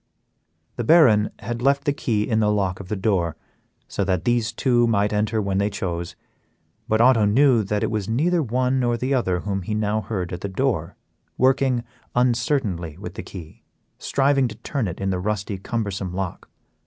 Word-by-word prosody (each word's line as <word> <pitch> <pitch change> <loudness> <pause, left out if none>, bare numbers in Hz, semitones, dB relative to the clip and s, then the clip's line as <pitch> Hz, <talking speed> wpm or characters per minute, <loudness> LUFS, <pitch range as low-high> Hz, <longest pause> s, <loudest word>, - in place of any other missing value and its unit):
The 120 - -1
Baron 115 -8 +5
had 120 +2 -5
left 140 +2 +2
the 145 - +1
key 110 -6 -1
in 110 -3 +1
the 105 -1 +3
lock 95 -3 0
of 100 - -9
the 105 - -2
door, 95 -5 0 0.5
so 100 - -2
that 95 -3 -1
these 120 -2 +1
two 120 0 +2
might 105 -2 +1
enter 110 +2 0
when 100 -2 0
they 100 +1 +1
chose, 85 -4 -4 0.7
but 110 - +1
Otto 115 -3 +5
knew 120 +3 +4
that 105 +1 -1
it - - 0
was 105 -2 -2
neither 160 +10 +2
the - - +2
one 130 +1 +1
nor 120 -1 +1
the 130 +4 -1
other 95 -9 0
whom 100 -2 -2
he 105 +4 -3
now 105 0 0
heard 95 -6 -4
at 90 - -5
the 100 - -3
door, 95 - -1 0.4
working 130 -2 +2 0.3
uncertainly 120 - 0
with - - -7
the - - -6
key, 80 -4 -11 0.4
striving 135 -1 +2
to 110 - -8
turn 120 +1 -3
it 85 - -6
in 95 0 -1
the 90 - -1
rusty, 100 0 -3
cumbersome 100 -4 -3
lock. 95 -2 -5
110 Hz, 190 wpm, -23 LUFS, 95-125 Hz, 0.7 s, Baron